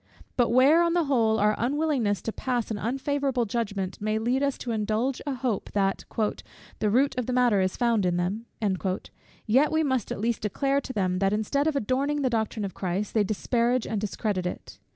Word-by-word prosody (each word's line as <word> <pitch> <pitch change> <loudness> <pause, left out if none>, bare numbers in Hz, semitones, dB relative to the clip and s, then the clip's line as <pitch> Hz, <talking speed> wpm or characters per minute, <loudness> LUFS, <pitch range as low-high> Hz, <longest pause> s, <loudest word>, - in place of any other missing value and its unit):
But 245 -2 +3
where, 265 +8 +5
on 340 -1 +2
the 345 - +3
whole, 230 -6 +2
our 210 +1 +3
unwillingness 260 -5 0
to 225 - -2
pass 245 -3 -2
an 210 - -3
unfavourable 270 +1 -1
judgment 200 -4 -3
may 215 +1 0
lead 245 +4 0
us 280 -1 0
to 240 - -4
indulge 220 +4 -1
a 275 - -1
hope, 245 -5 -2
that 195 -1 0 0.7
"the 215 - +1
root 265 +6 +3
of 245 - -3
the 255 - -1
matter 245 -5 +3
is 185 0 -1
found 235 -4 +2
in 175 0 +1
them;" 195 +6 -2 1.0
yet 265 +7 +3
we 315 0 +2
must 260 -6 -1
at - - -3
least 230 +2 -1
declare 275 +7 0
to 260 - -7
them, 185 -4 0
that 195 +1 +2
instead 250 +8 0
of 315 - +1
adorning 280 +4 0
the 260 - +1
doctrine 220 -2 -1
of 190 - -5
Christ, 190 +2 -3
they 215 - +3
disparage 235 +4 0
and 215 -3 -2
discredit 200 -3 -2
it. - - -7
235 Hz, 200 wpm, -26 LUFS, 210-265 Hz, 1.0 s, where